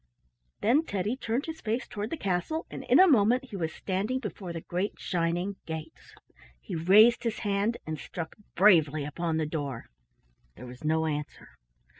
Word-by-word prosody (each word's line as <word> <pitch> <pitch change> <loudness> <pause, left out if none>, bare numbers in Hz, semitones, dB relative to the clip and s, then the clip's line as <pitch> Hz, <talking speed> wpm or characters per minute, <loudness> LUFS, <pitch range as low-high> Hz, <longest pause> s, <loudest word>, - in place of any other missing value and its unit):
Then 250 +9 +4
Teddy 205 - -2
turned 250 +1 -2
his 320 0 -7
face 230 +3 -2
toward 210 +1 -4
the 330 - -3
castle, 195 - -1
and - - -6
in - - +5
a 375 - +9
moment 250 - +4
he 230 - -9
was 165 -4 -2
standing 200 +9 -2
before 210 -7 -6
the 165 -1 -5
great 180 +5 -3
shining 175 +2 -1
gates. 160 0 -8 0.4
He - - -8
raised 210 +8 +6
his 230 -2 -1
hand 205 +3 +1
and 155 -1 -4
struck 165 -2 -6 0.2
bravely 160 -6 +5
upon 160 +2 -2
the 160 - 0
door. 145 - -5 0.6
There 125 - -10
was 125 +2 -11
no 160 +1 +1
answer. 150 -1 -4
185 Hz, 170 wpm, -28 LUFS, 160-225 Hz, 0.6 s, a